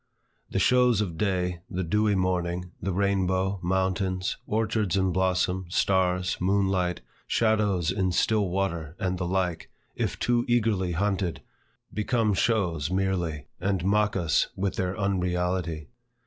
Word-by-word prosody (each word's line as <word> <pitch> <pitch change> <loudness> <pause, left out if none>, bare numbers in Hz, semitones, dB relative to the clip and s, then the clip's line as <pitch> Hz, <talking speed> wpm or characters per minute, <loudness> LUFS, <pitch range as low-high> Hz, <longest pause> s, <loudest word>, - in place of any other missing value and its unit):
The - - -3
shows 125 -3 +4
of 95 -6 -2
day, 90 -2 -1
the 95 +1 -2
dewy 105 +4 +2
morning, 90 -1 -1
the 95 - -1
rainbow, 95 0 +1
mountains, 95 0 0
orchards 110 -3 0
in 95 -1 +2
blossom, 95 0 0
stars, 90 0 +1
moonlight, 95 -2 +1 0.3
shadows 105 -6 +2
in 95 -1 0
still 105 +2 +2
water, 85 -4 -2
and 95 -1 -1
the 90 - -1
like, 90 -2 -1 0.3
if - - -2
too 120 -1 +1
eagerly 110 -7 +1
hunted, 95 -2 -1 0.5
become 110 0 +1
shows 90 -8 +1
merely, 90 -5 -1
and 95 -1 -1
mock 105 +1 +2
us 85 -8 +2
with 95 0 -1
their 95 0 -2
unreality. 90 -4 -1
95 Hz, 130 wpm, -27 LUFS, 90-100 Hz, 0.5 s, shows